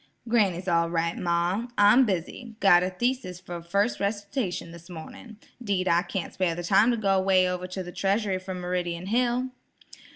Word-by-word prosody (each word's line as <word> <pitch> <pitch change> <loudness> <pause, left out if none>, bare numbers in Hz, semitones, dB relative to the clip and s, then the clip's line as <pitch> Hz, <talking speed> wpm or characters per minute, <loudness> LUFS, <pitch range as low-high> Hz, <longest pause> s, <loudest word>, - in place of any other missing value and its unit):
"Granny's 195 -6 +1
all 170 -1 +2
right, 170 0 -1
ma. 175 +6 0
I'm 220 +5 +6
busy. 210 +5 -4
Got 175 -3 +6
a 180 - 0
thesis 215 -2 -2
for 175 -1 -7
first 200 +7 0
recitation 200 -3 -3
this 170 +1 -13
morning. 180 +6 -10 0.3
'Deed 195 -4 -1
I 170 0 +4
can't 190 -1 -5
spare 180 -3 0
the 175 - -5
time 195 +6 +4
to 240 - +1
go 195 -3 +2
way 185 -1 +3
over 180 0 -3
to 185 +1 -5
the 175 - -8
treasury 195 0 0
from 185 -1 -6
Meridian 180 -1 -3
hill." 245 +4 0
185 Hz, 175 wpm, -26 LUFS, 175-205 Hz, 0.3 s, I'm